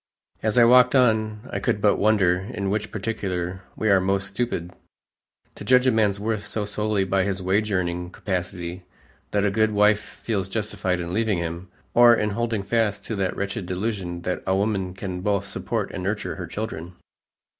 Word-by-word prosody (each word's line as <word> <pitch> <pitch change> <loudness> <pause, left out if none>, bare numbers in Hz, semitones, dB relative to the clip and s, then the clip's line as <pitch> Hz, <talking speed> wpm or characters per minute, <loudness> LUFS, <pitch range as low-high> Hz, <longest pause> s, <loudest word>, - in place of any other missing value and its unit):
As 110 +2 0
I 120 - +8
walked 125 +2 +6
on, 110 -2 +2
I 100 - -2
could 100 - 0
but 105 0 +3
wonder 100 -4 +3
in 100 -1 -4
which 105 0 -2
particular 95 -4 -3
we 110 - -1
are 95 -1 +5
most 95 +1 0
stupid 95 -4 -2 0.8
to - - -9
judge 125 0 +4
a 130 - +5
man's 105 -3 +2
worth 105 0 -2
so 105 -2 -2
solely 105 0 0
by 95 0 +1
his 95 0 -1
wage 100 +3 0
earning 90 -2 -1
capacity 90 -1 -4 0.5
that 105 0 +1
a 100 - +2
good 110 +2 +2
wife 105 0 +4
feels 100 -5 -4
justified 95 -4 -2
in 85 0 -4
leaving 110 -2 +1
him, 85 +2 -4 0.2
or 120 0 +7
in 105 -1 0
holding 115 -1 -1
fast 110 -1 0
to 110 - -3
that 95 -2 -1
wretched 100 -1 -3
delusion 90 -3 -3
that 90 +1 -2
a 95 - +2
woman 95 -2 -1
can 95 -2 -5
both 100 0 0
support 105 +1 -3
and - - -5
nurture 100 +2 -2
her 90 -3 -5
children. 90 -3 -5
100 Hz, 185 wpm, -24 LUFS, 95-110 Hz, 0.8 s, I